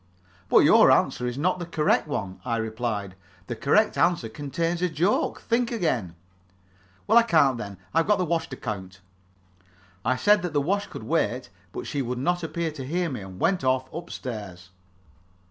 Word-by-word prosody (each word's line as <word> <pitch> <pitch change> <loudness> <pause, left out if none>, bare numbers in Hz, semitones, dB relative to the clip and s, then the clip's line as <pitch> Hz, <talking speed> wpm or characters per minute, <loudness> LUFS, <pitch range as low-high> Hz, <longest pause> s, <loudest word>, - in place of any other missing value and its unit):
"But - - +6
your - - +7
answer 125 - +2
is 125 +1 -4
not 180 +5 +1
the 175 - -4
correct 155 -2 +1
one," 95 -10 -4
I 115 -2 -1
replied. 110 -3 -3 0.3
"The 120 - -4
correct 210 - +2
answer 170 -10 +2
contains 165 +7 -2
a 180 - +2
joke. 170 +6 0
Think 235 +1 0
again." 125 - -1 0.9
"Well, 225 +3 +6
I - - +6
can't, 150 - +3
then. 100 -3 -7 0.2
I've 165 +1 +2
got 210 -1 +4
the 185 - 0
wash 165 0 -1
to - - -6
count." 95 -4 -6 1.0
I 130 +2 +2
said 205 +9 +4
that 180 -3 -4
the 145 - +3
wash 200 +8 0
could - - -9
wait, - - -1 0.2
but 370 -1 -6
she 145 - -2
would 125 -1 -3
not 175 +7 0
appear 165 0 -3
to 145 -3 -7
hear 170 +4 -1
me, 125 - -5
and 95 -1 -10
went 180 -3 +1
off 130 0 0
up 170 +2 -7
stairs. 100 -8 -7
145 Hz, 185 wpm, -25 LUFS, 115-175 Hz, 1.0 s, your